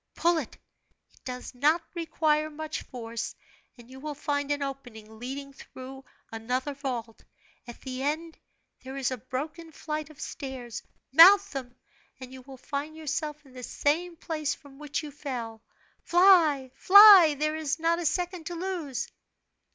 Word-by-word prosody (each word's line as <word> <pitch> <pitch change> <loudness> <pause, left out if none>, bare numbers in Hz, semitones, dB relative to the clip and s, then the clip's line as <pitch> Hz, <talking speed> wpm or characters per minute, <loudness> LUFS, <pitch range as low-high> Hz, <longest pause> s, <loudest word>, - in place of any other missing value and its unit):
Pull 340 -1 +2
it 275 - -7 0.6
it - - -27
does 250 0 -7
not 295 +7 +3
require 310 -2 0
much 310 0 -5
force 230 -2 -6 0.4
and 240 -1 -15
you 260 +1 -12
will 300 +1 -6
find 285 -1 -2
an 290 -1 0
opening 225 -6 -8
leading 275 +3 -6
through 265 0 -11 0.3
another 250 +5 -3
vault; 245 -5 -5 0.4
at 240 - -10
the 260 -1 -6
end 315 +4 -2 0.5
there 265 +1 -7
is 265 -1 -1
a 255 - -3
broken 300 +7 -6
flight 305 -1 -5
of 310 - -16
stairs, 255 -5 -7 0.3
mount 370 +8 +9
them, 255 -3 -7 0.4
and 255 0 -10
you 260 - -10
will 265 +1 -12
find 290 +4 -5
yourself 305 -1 -4
in 265 - -18
the 255 - -9
same 330 +7 -1
place 310 -3 -3
from 280 -1 -17
which 300 +1 -4
you 300 - -7
fell. 245 -6 -6 0.4
Fly, 335 -8 +4
fly! 390 -5 +9
There 305 +1 0
is 310 -2 -2
not 335 +1 +1
a 345 - -4
second 355 -1 -2
to 350 - -5
lose!" 340 -7 -4
285 Hz, 160 wpm, -27 LUFS, 260-315 Hz, 0.6 s, mount